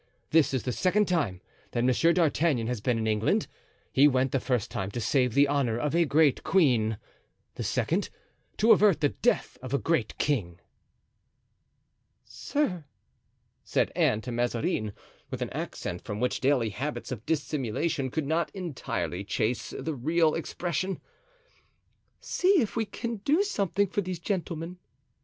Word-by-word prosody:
This 160 -2 +4
is 130 -4 -1
the 125 - -1
second 195 - +2
time 130 - 0 0.3
that 120 - 0
Monsieur 130 +7 +4
d'Artagnan 160 -7 +2
has 120 -2 -3
been 120 0 +1
in 110 - -1
England. 110 0 +1 0.5
He 140 +2 +6
went 130 -2 +2
the 135 - +1
first 125 -3 -1
time 95 -2 -3
to 110 - -4
save 125 0 +1
the 140 0 +6
honor 135 -5 +1
of 150 +4 -1
a 170 0 +4
great 150 -1 +3
queen; 120 - +3 0.6
the - - -7
second, - - 0 0.5
to 225 +3 +5
avert 200 -6 +5
the 145 - +4
death 245 - 0
of 130 +1 -3
a - - +4
great 160 -6 -1
king." 95 - -1 1.7
"Sir," 185 - -2 0.8
said - - 0
Anne 105 - +2
to 125 - -6
Mazarin, 115 -3 -1 0.4
with - - -3
an - - -6
accent - - -5
from 105 - -5
which 125 +1 0
daily 130 -4 +2
habits 135 +9 -4
of 115 -4 -5
dissimulation 145 -2 -1
could 155 +3 -2
not 160 +1 0
entirely 100 - -3
chase 110 +4 -1
the 160 - -3
real 155 +4 +2
expression, 175 +2 -2 1.2
"see 375 0 +2
if 225 -7 -1
we 225 -1 0
can 230 +2 -4
do 295 - +2
something 200 - 0
for 200 +1 -2
these 185 -2 -4
gentlemen." 175 -2 -3
145 Hz, 155 wpm, -28 LUFS, 120-170 Hz, 1.7 s, He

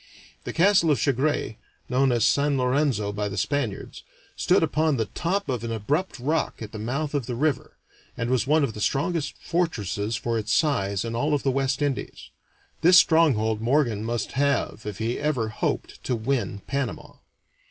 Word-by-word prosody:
The - - -3
castle 185 -1 +4
of 145 - +3
Chagres, 140 -2 0 0.3
known 130 +1 +2
as 120 -2 +2
San 140 +3 +2
Lorenzo 125 -5 +1
by 105 0 -2
the 100 - -6
Spaniards, 120 -3 -2 0.3
stood - - +3
upon 155 -2 +1
the 110 - 0
top 185 - -2
of 125 -4 -2
an 115 - -3
abrupt 145 - -1
rock 150 +6 -1
at 110 -2 -7
the 110 - -7
mouth 140 +7 -3
of 140 -5 -1
the 125 - -3
river, 145 +1 -1 0.4
and 120 +2 -2
was 130 -1 +1
one 155 +1 +3
of 120 - -1
the 105 - -7
strongest 145 +4 -1
fortresses 110 - -1
for 115 0 -1
its 110 0 -3
size 100 - +1
in 115 0 -4
all 145 +5 +1
of 145 - -3
the 135 - +2
West 135 +1 0
Indies. 140 -3 -4 0.5
This 180 +2 +7
stronghold 120 -12 +4
Morgan 120 -4 +1
must 115 -1 -2
have 135 -5 0
if 105 -3 -5
he 115 +2 -2
ever 140 -7 0
hoped 110 - -3
to 125 - 0
win 110 -4 -2
Panama. 140 -4 -4
130 Hz, 180 wpm, -25 LUFS, 110-145 Hz, 0.5 s, This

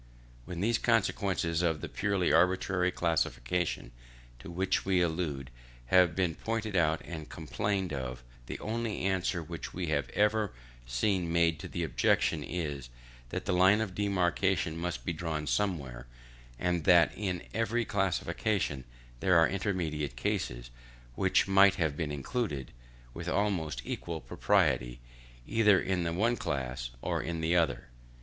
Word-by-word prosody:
When 90 -1 -5
these 115 +3 +2
consequences 95 -7 +1
of 80 -3 +1
the - - -5
purely 100 -3 0
arbitrary 90 0 +3
classification 80 -4 -1 0.5
to 60 - -10
which 95 +2 0
we 95 -1 +2
allude 80 -6 -1 0.4
have 90 -3 +6
been 90 -3 +1
pointed 110 +2 -3
out 80 -2 +2
and 80 -3 -7
complained 95 +2 -2
of, 65 -2 -5 0.2
the - - -4
only 115 0 -2
answer 95 -2 0
which - - -7
we 90 -2 -2
have 70 -5 0
ever 105 -1 +2 0.3
seen 85 - 0
made 85 -1 +2
to - - -6
the 85 - -3
objection 75 +1 +1
is, 70 -5 -4 0.4
that - - -4
the 100 - 0
line 95 +4 +5
of 110 -4 -2
demarcation 90 -6 +1
must 85 +1 -4
be 90 - -1
drawn 80 -2 -3
somewhere, 70 -12 -2 0.5
and 90 +1 0
that 85 -1 +6
in 95 -4 -3
every 115 +2 0
classification 95 -6 -1 0.3
there 90 +3 +4
are 80 -1 +6
intermediate 85 - -2
cases, - - -2 0.4
which - - +2
might 95 0 +6
have 80 -4 0
been 75 -2 -2
included, 75 - -3 0.4
with 85 0 -5
almost 90 -11 0
equal 85 +4 -4
propriety, - - +1 0.5
either 105 -4 +4
in 95 -2 -1
the 85 - 0
one 115 +7 +1
class 65 -3 -3
or - - 0
in 85 -1 -3
the 80 +2 +1
other. 80 -7 +1
85 Hz, 145 wpm, -30 LUFS, 75-95 Hz, 0.5 s, have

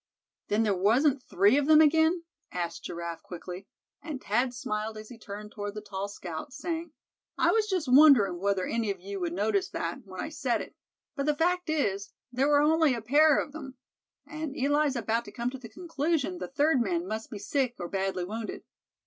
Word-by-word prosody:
"Then 215 +2 +2
there 210 -2 +2
wasn't 250 +9 +3
three 205 +5 +3
of 285 - -1
them 310 -1 +7
again?" 320 +3 +4 0.3
asked 175 -1 -4
Giraffe, 170 -1 -5
quickly; 180 +2 -8 0.3
and 295 -3 -5
Thad 245 +3 0
smiled 220 -2 -4
as 215 0 -9
he 245 - -11
turned 210 0 -8
toward 205 -1 -5
the 210 - -5
tall 200 -1 -4
scout, 185 - -7
saying: 330 +3 -4 0.5
"I - - +4
was 440 -1 +2
just 365 -7 -1
wondering 250 - +6
whether 195 -1 0
any 230 -2 -1
of 195 -2 -2
you 195 +2 -6
would 175 -2 -2
notice 220 - 0
that, - - -3
when - - -10
I - - -3
said - - -1
it; - - -8 0.4
but 280 -1 -2
the 300 - +3
fact 355 +1 +1
is, 205 -10 -1 0.2
there 260 +3 +1
were 290 -1 +5
only 315 -3 +4
a 230 - -5
pair 295 +5 +5
of 290 - -2
'em; 270 -4 -8 0.5
and 305 -2 -6
Eli's 290 +1 +2
about 230 0 -1
come 240 +1 -2
to 265 - -8
the 230 -3 -10
conclusion 330 +2 -2
the - - -4
third 285 0 +2
man 180 -5 -1
must 220 +2 -4
be 210 - -6
sick, 245 +4 -1
or 175 - -5
badly 190 -1 -2
wounded. 220 +3 -5
245 Hz, 200 wpm, -28 LUFS, 200-300 Hz, 0.5 s, them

